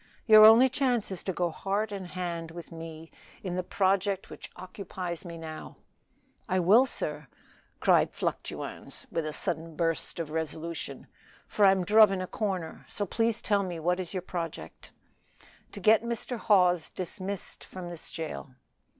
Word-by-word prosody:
"Your 215 -2 +9
only 230 +4 +8
chance 250 -5 0
is 185 - -4
to 190 - 0
go 175 -1 -1
heart 200 +6 -2
and 195 -3 -5
hand 175 -2 -4
with 170 +1 -10
me 165 -1 -9 0.3
in 180 -2 -3
the 185 - 0
project 195 +1 0
which - - -9
occupies 185 -1 -6
me 170 -1 -7
now." 160 -1 -8 0.7
"I 185 0 +2
will, 215 +9 +6
sir," 150 - -4 0.5
cried - - +4
Fluctuans, - - -5
with 165 -2 -1
a - - -2
sudden 160 +1 -3
burst 165 -1 -1
of 160 -2 -4
resolution, 160 +1 -4 0.4
"for 205 - +3
I'm 190 -2 +3
druv 215 +1 +7
in 195 - -1
a 185 - -2
corner. 185 -5 -3
So 205 - -1
please 225 +3 0
tell 205 -1 +2
me 180 -3 -4
what 180 +3 +1
is 180 -2 -4
your 185 -2 -3
project?" 170 -3 -6 0.8
"To - - -8
get 215 0 +5
Mr. 235 +1 -4
Hawes 180 -6 +3
dismissed 190 +2 -5
from 185 -2 -8
this 170 -2 -9
jail." 155 -5 -6
185 Hz, 160 wpm, -29 LUFS, 165-205 Hz, 0.8 s, Your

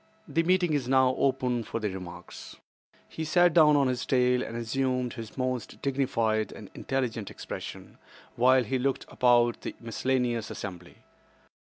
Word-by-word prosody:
The 165 - +1
meeting 180 -1 +2
is 140 -4 -1
now 130 0 +4
open 130 -3 +1
for 115 - -4
remarks." 90 -4 -7 0.5
He 160 - -6
sat 175 +2 +4
down 150 -3 +6
on 140 -2 +3
his 130 -1 -1
tail 125 -1 +2
and 115 -2 -5
assumed 125 +1 -1
his 115 -1 -9
most 130 -3 -3
dignified 115 -6 0
and - - -11
intelligent 120 -6 -3
expression, - - -8 0.4
while 130 +1 +4
he 130 +4 -1
looked 135 +1 -1
about 120 -1 +3
the - - -6
miscellaneous 120 -1 -1
assembly. 90 -3 -8
125 Hz, 145 wpm, -28 LUFS, 115-135 Hz, 0.5 s, down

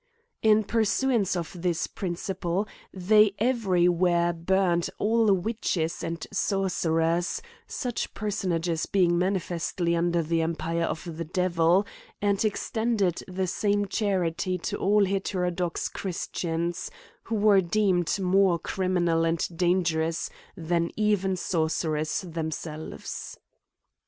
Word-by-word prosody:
In 215 0 +5
pursuance 225 -1 +1
of 175 0 -5
this 175 -2 0
principle 185 +1 -3 0.2
they 205 +2 +4
every 210 -7 +2
where 175 -1 +2
burned 175 0 +1
all 220 0 +3
witches 190 -4 -1
and 165 0 -4
sorcerers; 175 -4 0 0.3
such 245 -2 -3
personages 175 -5 -1
being 180 -3 +3
manifestly 175 -2 -1
under 170 0 +1
the 165 +1 0
empire 165 +1 -1
of 160 - -3
the 165 - -2
devil; 175 +2 +2 0.3
and 200 0 +1
extended 215 -3 0
the 185 0 -2
same 205 +2 0
charity 185 -3 0
to 170 - -3
all 205 +1 +3
heterodox 180 -3 -1
christians, 170 -1 -3 0.4
who 230 - -2
were 205 -2 +5
deemud 185 -1 +1
more 190 -1 +3
criminal 175 -2 0
and 165 -1 +1
dangerous 165 -2 +1 0.3
than 170 0 0
even 205 -3 +1
sorcerers 160 -3 -1
themselves. 160 - -6
180 Hz, 105 wpm, -27 LUFS, 170-200 Hz, 0.4 s, In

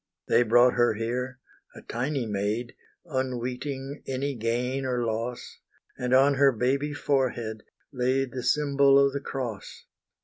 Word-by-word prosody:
They - - +4
brought 120 +2 +5
her 120 -2 +2
here 125 +3 -3 0.4
a - - -11
tiny 130 +2 -2
maid, 105 +3 -2 0.3
Unweeting 130 0 -4
any 135 +2 -2
gain 125 +3 -1
or 125 -2 -1
loss, 115 +2 -4 0.4
And 125 0 -3
on 135 +2 +5
her 140 0 +5
baby 135 +5 0
forehead 125 -7 -1 0.3
laid 130 +1 0
The 130 - -4
symbol 140 0 +3
of 140 0 +4
the 140 - -2
Cross. 120 -8 -6
125 Hz, 135 wpm, -27 LUFS, 120-135 Hz, 0.4 s, brought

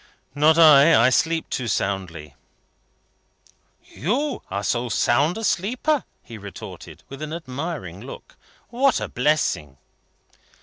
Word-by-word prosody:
"Not 150 +3 +4
I. 155 -2 +7
I 125 +3 +4
sleep 165 +4 +1
too 125 - -3
soundly." 90 -8 -3 1.5
"You 245 - -2
are 100 +2 -3
so 120 +4 -1
sound 140 - +1
a 225 - -6
sleeper?" 250 - 0 0.2
he 115 -2 -11
retorted, 100 -1 -10
with 135 +1 -10
an 155 0 -5
admiring 140 - -6
look. 130 - -11 0.3
"What 255 +1 +2
a - - -4
blessing!" 125 - -1
140 Hz, 120 wpm, -22 LUFS, 110-165 Hz, 1.5 s, I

